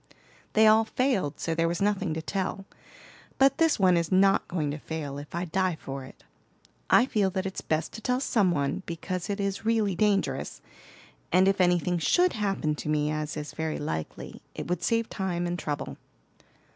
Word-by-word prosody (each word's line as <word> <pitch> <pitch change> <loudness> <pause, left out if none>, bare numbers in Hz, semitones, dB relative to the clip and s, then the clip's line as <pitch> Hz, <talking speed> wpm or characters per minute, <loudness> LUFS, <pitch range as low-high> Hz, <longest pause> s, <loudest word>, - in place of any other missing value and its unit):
"They 220 0 +5
all 220 +1 +6
failed, 220 - 0
so 165 - -1
there 165 +1 +1
was 170 +1 -2
nothing 200 -4 0
to 160 - -4
tell. 195 +2 -3 0.7
But 275 +3 +4
this 325 -1 +4
one 185 -2 +5
is 170 +1 -1
not 195 +1 +4
going 155 -5 -1
to 150 - -5
fail, 145 -3 -5
if 145 +3 -9
I 175 +1 -1
die 185 0 0
for 135 0 -6
it. - - -15 0.7
I 240 - +6
feel 210 -7 +1
that 190 0 -3
it's 190 - -4
best 155 0 -1
to 220 - -8
tell 250 +3 0
some 220 -8 +2
one, 140 0 0
because 175 +2 -4
it 200 0 -2
is 195 0 -2
really 220 -3 +2
dangerous; 200 +2 0 0.7
and 185 +1 +5
if 195 -1 +2
anything 175 -1 +2
should 355 - +3
happen 195 -7 -1
to 150 - -5
me, 150 0 +1
as 155 0 -3
is 150 -1 -6
very 160 -1 -2
likely, 80 - -5
it - - -5
would 175 -1 -2
save 230 +2 +1
time 180 -3 -2
and 175 0 -2
trouble." 145 -1 -4
185 Hz, 190 wpm, -27 LUFS, 160-205 Hz, 0.7 s, all